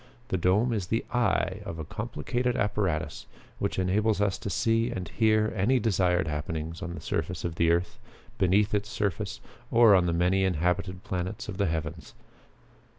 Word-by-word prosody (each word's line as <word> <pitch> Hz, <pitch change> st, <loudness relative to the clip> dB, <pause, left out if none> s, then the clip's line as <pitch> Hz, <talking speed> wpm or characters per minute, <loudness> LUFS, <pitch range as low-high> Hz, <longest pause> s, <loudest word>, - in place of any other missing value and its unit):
The 95 Hz, -, 0 dB
dome 100 Hz, +8 st, +2 dB
is 100 Hz, -5 st, -2 dB
the 115 Hz, +4 st, -1 dB
'eye' 105 Hz, -4 st, +1 dB
of 85 Hz, -5 st, -6 dB
a 80 Hz, -, -5 dB
complicated 120 Hz, -, -2 dB
apparatus 85 Hz, -7 st, -1 dB, 0.3 s
which -, -, -1 dB
enables 100 Hz, +3 st, +1 dB
us 100 Hz, -2 st, +1 dB
to -, -, -4 dB
see 115 Hz, +6 st, +1 dB
and 95 Hz, -8 st, -4 dB
hear 110 Hz, +1 st, +2 dB
any 115 Hz, +7 st, +3 dB
desired 90 Hz, -5 st, +2 dB
happening 75 Hz, +1 st, -3 dB
on 85 Hz, -2 st, -5 dB
the -, -, -7 dB
surface 85 Hz, +1 st, -3 dB
of 85 Hz, -, -2 dB
the 85 Hz, 0 st, +2 dB
earth, 85 Hz, +1 st, 0 dB, 0.4 s
beneath 100 Hz, +3 st, +3 dB
its 105 Hz, +1 st, 0 dB
surface, 105 Hz, 0 st, -2 dB, 0.3 s
or 115 Hz, -3 st, +6 dB
on 90 Hz, -2 st, +4 dB
the -, -, +1 dB
many 90 Hz, +3 st, +2 dB
inhabited 90 Hz, +1 st, 0 dB
planets 90 Hz, 0 st, -4 dB
of 100 Hz, -3 st, -6 dB
the 100 Hz, -1 st, +1 dB
heavens. 80 Hz, +1 st, -4 dB
95 Hz, 170 wpm, -28 LUFS, 85-110 Hz, 0.4 s, or